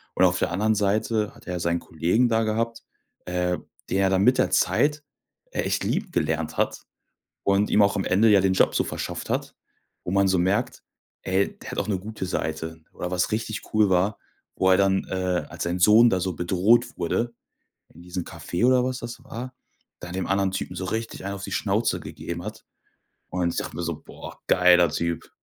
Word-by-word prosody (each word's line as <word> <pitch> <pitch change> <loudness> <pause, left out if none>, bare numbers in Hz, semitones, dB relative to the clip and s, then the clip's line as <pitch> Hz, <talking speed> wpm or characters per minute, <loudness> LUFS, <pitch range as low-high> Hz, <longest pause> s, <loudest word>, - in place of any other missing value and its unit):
Und 95 - +5
auf 90 0 +2
der - - 0
anderen 105 +4 +2
Seite 105 +1 0
hat 120 - -17
er 90 - -3
ja 90 - -2
seinen 85 0 0
Kollegen 85 +12 +1
da 115 0 +2
gehabt, 115 +1 -1 0.4
äh, 90 0 0 0.3
der 95 +1 +2
er 95 - +3
dann 95 0 +2
mit 125 +4 +5
der - - +2
Zeit 150 0 +2 0.5
echt - - -1
lieb - - -1
gelernt 80 -1 -1
hat - - 0 0.6
und 100 +1 +2
ihm 105 - +4
auch 100 0 +3
am 95 - 0
Ende 110 +4 +4
ja 100 -2 +6
den 95 0 +2
Job - - +3
so - - +3
verschafft - - -5
hat, - - -2 0.5
wo 90 - -4
man 100 0 +3
so 95 -1 +2
merkt, 95 +4 0 0.4
ey, 95 +1 0
der - - -8
hat - - -6
auch - - -2
'ne 100 -3 0
gute 105 0 -6
Seite. 80 -2 -3
Oder 90 - -5
was 90 +2 0
richtig 110 0 -2
cool 105 -2 +4
war, 95 +3 +1 0.4
wo 95 - +2
er 95 - +6
dann, 95 -1 +2
äh, 90 -4 -1
als - - -5
sein 85 +1 -2
Sohn 110 +5 +7
da 95 - +1
so 95 0 -2
bedroht 100 +9 +2
wurde, 115 +8 -1 0.6
in 85 - -16
diesem 90 0 -5
Café 85 +7 -2
oder 125 -1 +4
was 130 0 -2
das 120 +1 -7
war, 130 +1 -7 0.5
da 90 - -8
dem 95 0 -2
anderen 95 0 +1
Typen 95 -1 -4
so 95 - -3
richtig 110 -1 -4
einen 100 0 -3
auf 100 - -7
die - - -6
Schnauze - - 0
gegeben 85 0 -6
hat. 105 - -8 0.6
Und 90 -2 -1
ich - - -7
dachte - - -4
mir 85 - -3
so: 80 -2 -3
„Boah, - - -11
geiler 90 -1 +5
Typ!” 85 +1 -3
95 Hz, 210 wpm, -25 LUFS, 90-110 Hz, 0.6 s, Sohn